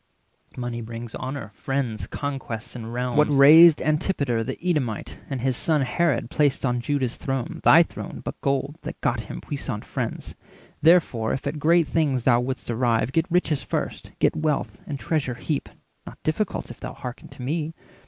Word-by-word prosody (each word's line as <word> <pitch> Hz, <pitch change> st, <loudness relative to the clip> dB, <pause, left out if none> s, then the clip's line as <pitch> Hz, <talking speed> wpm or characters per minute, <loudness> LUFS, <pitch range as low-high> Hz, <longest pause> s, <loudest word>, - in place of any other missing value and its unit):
Money 120 Hz, -1 st, -3 dB
brings 115 Hz, 0 st, -7 dB
honour, 130 Hz, -4 st, -5 dB
friends, 130 Hz, -1 st, -2 dB
conquest, 130 Hz, -5 st, -5 dB
and 115 Hz, -1 st, -6 dB
realms. 125 Hz, +1 st, -2 dB
What 150 Hz, 0 st, +5 dB
raised 150 Hz, +3 st, +8 dB
Antipater 145 Hz, -7 st, 0 dB
the -, -, -4 dB
Edomite, 150 Hz, -, -1 dB
And 135 Hz, -4 st, -3 dB
his 130 Hz, 0 st, +1 dB
son 155 Hz, +3 st, +2 dB
Herod 140 Hz, -3 st, 0 dB
placed 145 Hz, -3 st, +2 dB
on 125 Hz, -1 st, 0 dB
Juda's 130 Hz, -2 st, -1 dB
throne, 135 Hz, -3 st, -3 dB
Thy -, -, +8 dB
throne, -, -, -8 dB
but -, -, -6 dB
gold, 140 Hz, +2 st, -1 dB
that -, -, -7 dB
got 120 Hz, 0 st, +1 dB
him 110 Hz, -, -6 dB
puissant 135 Hz, -7 st, -5 dB
friends? -, -, -4 dB, 0.5 s
Therefore, 155 Hz, -10 st, +4 dB
if 135 Hz, -, -4 dB
at 145 Hz, +2 st, -2 dB
great 165 Hz, +1 st, +4 dB
things 140 Hz, -7 st, +1 dB
thou 120 Hz, -2 st, +4 dB
wouldst 125 Hz, -1 st, -3 dB
arrive, 115 Hz, 0 st, +1 dB
Get 165 Hz, +5 st, +1 dB
riches 165 Hz, -5 st, +1 dB
first, -, -, -4 dB
get -, -, +2 dB
wealth, 150 Hz, -9 st, -1 dB
and 145 Hz, -, -3 dB
treasure 140 Hz, -4 st, -1 dB
heap— 145 Hz, +4 st, -3 dB, 0.4 s
Not -, -, -9 dB
difficult, 155 Hz, -, -1 dB
if 120 Hz, -, -12 dB
thou -, -, -6 dB
hearken 125 Hz, -1 st, -8 dB
to 125 Hz, -, -11 dB
me. 155 Hz, +4 st, -2 dB
135 Hz, 175 wpm, -24 LUFS, 120-150 Hz, 0.5 s, raised